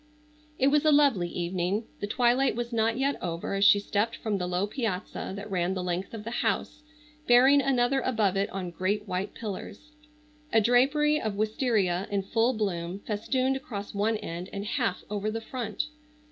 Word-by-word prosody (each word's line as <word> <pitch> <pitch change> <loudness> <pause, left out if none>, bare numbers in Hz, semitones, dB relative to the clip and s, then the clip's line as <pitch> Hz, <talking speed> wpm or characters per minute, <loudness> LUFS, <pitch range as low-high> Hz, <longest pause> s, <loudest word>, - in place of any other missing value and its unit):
It 270 - +4
was 295 +1 +3
a 310 - +5
lovely 280 -12 +4
evening. 180 +4 -1 0.2
The 205 - -3
twilight 245 +3 +2
was 240 0 -4
not 225 0 +1
yet 275 +1 0
over 170 +1 -3
as 195 0 +1
she 205 - +7
stepped 210 +3 -1
from 210 -3 -2
the 180 - -2
low 180 +2 0
piazza 210 -6 -3
that 200 +1 -7
ran 180 0 0
the 185 - -3
length 180 +4 -3
of 215 - -7
the 230 - -5
house 300 - -1 0.5
bearing 260 +4 +6
another 265 0 +2
above 215 -6 +1
it 195 +1 0
on 185 -2 -5
great 205 +4 -1
white 185 +2 -3
pillars. 220 +6 -7 0.6
A 225 - +5
drapery 275 +7 +3
of 215 -2 -2
wistaria 210 -4 0
in 200 -1 -1
full 230 +5 +1
bloom 185 -5 -2
festooned 255 +5 0
across 210 -6 -7
one 215 +2 +1
end 175 -1 -6
and 200 +1 -5
half 230 -4 -1
over 210 0 -2
the 225 +1 -3
front. 225 -1 -4
215 Hz, 180 wpm, -28 LUFS, 195-245 Hz, 0.6 s, she